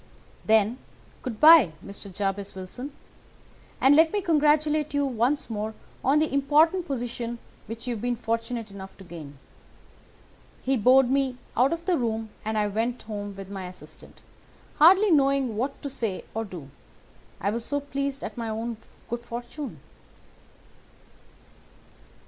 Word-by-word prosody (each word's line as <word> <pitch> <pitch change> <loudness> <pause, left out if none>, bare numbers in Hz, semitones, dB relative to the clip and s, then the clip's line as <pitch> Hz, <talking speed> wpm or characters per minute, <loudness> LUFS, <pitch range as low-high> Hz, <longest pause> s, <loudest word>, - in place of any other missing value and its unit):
"'Then, 220 +3 +3 0.4
good 230 -4 -5
bye, 305 - +8
Mr. 200 0 -8
Jabez 195 +1 -3
Wilson, 220 +9 -7 0.9
and 270 +2 +6
let 320 +1 +6
me 415 - 0
congratulate 305 -3 +2
you 285 0 +2
once 260 +3 0
more 220 -1 -4 0.3
on 275 +3 +4
the 310 -2 +1
important 310 +6 +3
position 240 -2 -3 0.3
which 230 +2 -7
you 245 - -1
have 220 - -6
been 245 0 0
fortunate 230 -1 -3
enough 195 -1 -10
to 195 - -12
gain.' 155 -6 -10 1.3
He 270 +1 +2
bowed 255 +2 +5
me 270 -2 +1 0.2
out 255 +3 +4
of 335 0 -3
the 355 -4 +2
room 225 -2 -2
and 220 0 -2
I 210 - +2
went 225 +4 -2
home 205 -2 -6
with 195 0 -9
my 190 -2 -5
assistant, 180 0 -12 0.6
hardly 380 +6 +7
knowing 275 -5 +3
what 265 +6 -2
to - - -2
say 220 -7 -3
or 225 +1 -2
do, 170 -9 -9 0.7
I 200 - 0
was 230 +1 -3
so 285 +4 -1
pleased 280 -1 -3
at - - -5
my 230 -2 -4
own 225 +1 -3 0.3
good 235 +1 -4
fortune. 240 +5 -7
240 Hz, 150 wpm, -26 LUFS, 215-280 Hz, 1.3 s, bye